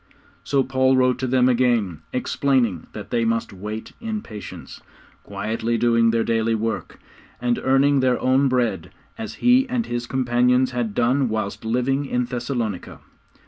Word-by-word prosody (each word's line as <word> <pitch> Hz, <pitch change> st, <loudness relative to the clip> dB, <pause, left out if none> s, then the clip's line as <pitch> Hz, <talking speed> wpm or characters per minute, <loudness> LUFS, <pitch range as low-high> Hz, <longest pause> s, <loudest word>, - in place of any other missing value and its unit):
So 140 Hz, -1 st, +1 dB
Paul 130 Hz, 0 st, +2 dB
wrote 125 Hz, -1 st, +2 dB
to 130 Hz, -, -1 dB
them 125 Hz, 0 st, +3 dB
again, 120 Hz, -9 st, +1 dB
explaining 125 Hz, -, 0 dB
that -, -, -8 dB
they 120 Hz, -1 st, +1 dB
must 115 Hz, -1 st, -1 dB
wait 105 Hz, +3 st, -6 dB
in 220 Hz, -2 st, -4 dB
patience, 105 Hz, -2 st, -9 dB, 0.4 s
quietly 110 Hz, +3 st, -2 dB
doing 115 Hz, 0 st, +3 dB
their 115 Hz, 0 st, +1 dB
daily 115 Hz, 0 st, +1 dB
work, 110 Hz, +1 st, -3 dB, 0.4 s
and 120 Hz, 0 st, 0 dB
earning 135 Hz, +1 st, +3 dB
their 130 Hz, -1 st, +2 dB
own 130 Hz, +2 st, +3 dB
bread, 115 Hz, -9 st, 0 dB, 0.3 s
as 225 Hz, -, -6 dB
he 255 Hz, +2 st, +5 dB
and 240 Hz, -2 st, -1 dB
his 120 Hz, 0 st, -4 dB
companions 125 Hz, 0 st, +2 dB
had 120 Hz, -4 st, -3 dB
done 125 Hz, +2 st, +2 dB
whilst 110 Hz, -2 st, -3 dB
living 125 Hz, +5 st, 0 dB
in 125 Hz, -1 st, 0 dB
Thessalonica. 120 Hz, -5 st, -4 dB
120 Hz, 150 wpm, -22 LUFS, 115-130 Hz, 0.4 s, he